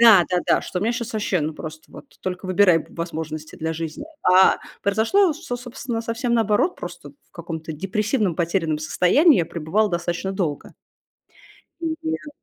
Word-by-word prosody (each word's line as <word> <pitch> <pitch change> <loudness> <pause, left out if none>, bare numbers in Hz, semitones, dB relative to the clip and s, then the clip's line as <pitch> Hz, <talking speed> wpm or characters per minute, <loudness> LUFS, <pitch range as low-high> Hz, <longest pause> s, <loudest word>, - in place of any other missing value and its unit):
Да-да-да. 185 -6 +5
Что 180 - -4
у 180 - -3
мя 230 - +1
щас 235 -1 -4
ваще, 205 -4 0
ну 155 +1 -1
просто 155 0 -9
вот- - - -11 0.2
только 185 0 -4
выбирай 185 -2 +5
в - - -11
возможности 160 -2 -5
для 160 0 -2
жизни. 165 - -5 0.2
А 185 +1 +6 0.2
произошло 230 - +3
всё, 315 -5 -5
собственно, 245 -1 -5
совсем 235 +1 -1
наоборот. 220 - +2
Просто 175 -4 -8
в 140 - -31
каком-то 160 -1 -6
депрессивном 200 - -1
потерянном 165 -2 0
состоянии 180 - +4
я 170 - +2
пребывала 180 +7 0
достаточно 175 +2 -2
долго. 170 -7 -3 1.1
М. 325 -1 -1
Нет. 320 -1 -3
185 Hz, 160 wpm, -23 LUFS, 165-230 Hz, 1.1 s, А